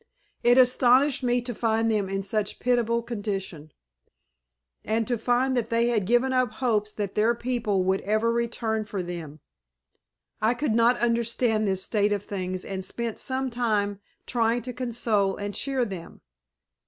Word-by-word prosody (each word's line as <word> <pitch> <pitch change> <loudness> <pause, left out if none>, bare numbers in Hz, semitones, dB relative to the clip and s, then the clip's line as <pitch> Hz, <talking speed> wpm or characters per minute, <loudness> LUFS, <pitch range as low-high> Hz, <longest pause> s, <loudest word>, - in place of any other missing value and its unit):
It 245 +1 +4
astonished 255 +2 +4
me 245 -1 +1
to 245 0 -4
find 225 0 +1
them 205 -3 0
in 195 0 -2
such 205 +1 -1
a - - -24
pitiable 235 -1 +1
condition, 195 -9 -5 1.1
and 225 +1 0
to 245 - 0
find 250 +3 +1
that 240 -3 -1
they 235 +1 +2
had 215 -6 0
given 245 +3 +3
up 255 -3 +1
hopes 215 -5 0
that 205 -2 -3
their 225 +3 +2
people 235 -6 -1
would 190 +1 +1
ever 215 +3 +1
return 230 -2 -1
for 205 -3 -4
them. 165 -4 -7 1.0
I 220 +3 +2
could 240 -2 -1
not 235 +2 +4
understand 230 -2 +1
this 190 -1 0
state 210 0 +1
of 205 -1 -2
things 185 -2 -4
and 190 -1 -4
spent 235 +2 -4
some 260 0 -2
time 210 -4 0 0.3
trying 235 -1 +1
to 250 +1 -5
console 225 -5 0
and 205 0 -4
cheer 265 0 0
them. 190 -6 -8
225 Hz, 165 wpm, -26 LUFS, 205-240 Hz, 1.1 s, It